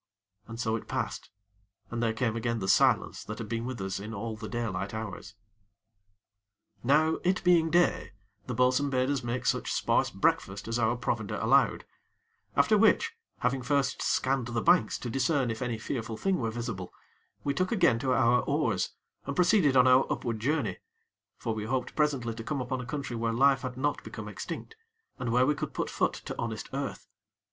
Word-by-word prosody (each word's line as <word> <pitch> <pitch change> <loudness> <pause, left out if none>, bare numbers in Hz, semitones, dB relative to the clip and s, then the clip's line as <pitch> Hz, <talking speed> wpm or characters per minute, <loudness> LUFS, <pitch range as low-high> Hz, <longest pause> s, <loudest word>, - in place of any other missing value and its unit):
And 115 0 -8
so 110 -2 0
it 115 - -6
passed, - - -3 0.6
and 120 0 -2
there 115 -1 +2
came 115 0 -1
again 115 0 -1
the 95 -4 -3
silence 95 - +3
that 105 - -6
had 115 - -5
been 115 +1 -3
with 130 -2 -5
us 95 0 -3
in 105 +3 -6
all 110 +2 -4
the 110 0 -7
daylight 105 -4 -3
hours. 110 0 -6 1.5
Now, 155 +5 +3
it 185 +1 +1
being 170 -3 +4
day, 175 -7 +2 0.3
the 125 - -3
bo'sun 125 +3 +3
bade 130 0 +1
us 140 -3 -1
make 120 +1 -3
such - - 0
sparse - - +2
breakfast 95 +2 0
as 115 +1 -1
our 115 +1 +2
provender 115 -4 -2
allowed; - - +3 0.7
after - - +4
which, - - +4 0.3
having 125 +2 +1
first 140 +2 0
scanned 130 -2 +1
the 120 -1 -1
banks 110 - +4
to 120 - -5
discern 135 -1 +1
if 115 - -6
any 120 -2 -1
fearful 115 -1 -4
thing 195 +5 0
were 115 -3 -1
visible, 110 -6 -5 0.5
we 140 - 0
took 185 +6 0
again 170 - +3
to 130 +1 0
our 125 -1 +4
oars, - - 0 0.3
and 140 - -3
proceeded 180 -6 +4
on 125 - +7
our 130 +1 +5
upward 115 -3 -2
journey; 140 +1 -1 0.6
for 115 - -2
we 110 -1 -4
hoped 125 +2 -2
presently 140 -7 +1
to 115 0 -7
come 145 +3 -2
upon 130 0 -3
a 125 - -8
country 140 -3 -4
where 115 0 -1
life 135 +2 +4
had 130 -2 -5
not 145 +2 -1
become - - -7
extinct, 450 - -7 0.4
and 125 -2 -2
where 125 +2 +4
we 150 - +3
could 150 0 -5
put - - -2
foot - - +1
to - - -7
honest - - -4
earth. - - -4
125 Hz, 190 wpm, -29 LUFS, 115-140 Hz, 1.5 s, on